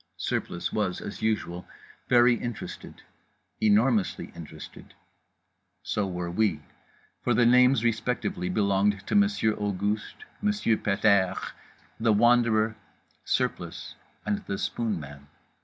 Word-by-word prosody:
Surplice 85 Hz, -, -3 dB
was, 100 Hz, -4 st, -1 dB
as -, -, -7 dB
usual, 100 Hz, -5 st, -2 dB, 0.4 s
very 120 Hz, 0 st, +6 dB
interested, 120 Hz, -1 st, -6 dB, 0.6 s
enormously 110 Hz, 0 st, +2 dB
interested. 80 Hz, -2 st, -11 dB, 0.9 s
So 105 Hz, -2 st, -1 dB
were 90 Hz, -2 st, -4 dB
we: 100 Hz, -5 st, +1 dB, 0.6 s
for -, -, +2 dB
the 120 Hz, -, +4 dB
names 125 Hz, 0 st, +5 dB
respectively 115 Hz, -5 st, -1 dB
belonged 100 Hz, 0 st, +1 dB
to -, -, -4 dB
Monsieur 200 Hz, -, +3 dB
Auguste, 105 Hz, -, -3 dB, 0.2 s
Monsieur 210 Hz, -, +1 dB
Pet 100 Hz, +1 st, -2 dB
airs, 100 Hz, -4 st, +3 dB, 0.5 s
The 110 Hz, -1 st, +3 dB
Wanderer, 115 Hz, -1 st, +3 dB, 0.5 s
Surplice -, -, -2 dB, 0.3 s
and 105 Hz, -1 st, 0 dB
The 100 Hz, -, -2 dB
Spoonman. 75 Hz, -14 st, -4 dB
105 Hz, 105 wpm, -27 LUFS, 95-120 Hz, 0.9 s, very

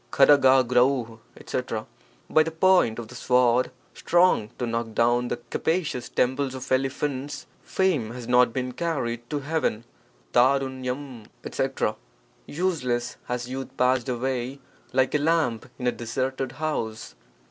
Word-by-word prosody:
■as^MiJ: 130 Hz, -3 st, +4 dB, 0.2 s
etc. -, -, -4 dB, 0.2 s
— -, -, -33 dB
By 155 Hz, -, +6 dB
the 160 Hz, -, +1 dB
point 165 Hz, -8 st, +3 dB
of 120 Hz, -2 st, -6 dB
the -, -, -11 dB
sword 125 Hz, 0 st, +2 dB, 0.2 s
strong 175 Hz, -11 st, +3 dB
to 125 Hz, -, -2 dB
knock 115 Hz, -1 st, -3 dB
down 120 Hz, +1 st, +2 dB
the -, -, -2 dB
capacious 160 Hz, -7 st, -1 dB
temples 130 Hz, +1 st, 0 dB
of 130 Hz, +1 st, -8 dB
elephants, 135 Hz, +1 st, -1 dB, 0.2 s
fame 175 Hz, -, 0 dB
has 120 Hz, 0 st, -8 dB
not 125 Hz, -1 st, +4 dB
been 125 Hz, +1 st, -3 dB
carried 120 Hz, -6 st, -3 dB
to 145 Hz, -1 st, -2 dB
heaven. 145 Hz, -7 st, -1 dB, 0.5 s
<n 120 Hz, -, +6 dB
I 135 Hz, +3 st, +5 dB
<? -, -, -4 dB
u 130 Hz, -1 st, -5 dB
<H -, -, -20 dB
etc. -, -, -1 dB, 0.3 s
— -, -, -35 dB
Useless 145 Hz, -8 st, -1 dB
has 125 Hz, 0 st, -3 dB
youth 130 Hz, +1 st, -6 dB
passed 125 Hz, -1 st, +2 dB
away 130 Hz, +1 st, -2 dB, 0.3 s
like 130 Hz, 0 st, +2 dB
a 150 Hz, -, +3 dB
lamp 145 Hz, -7 st, +1 dB
in 125 Hz, -, -5 dB
a 125 Hz, -, +3 dB
deserted 130 Hz, +2 st, -3 dB
house. 115 Hz, -, -3 dB
130 Hz, 150 wpm, -25 LUFS, 120-140 Hz, 0.5 s, By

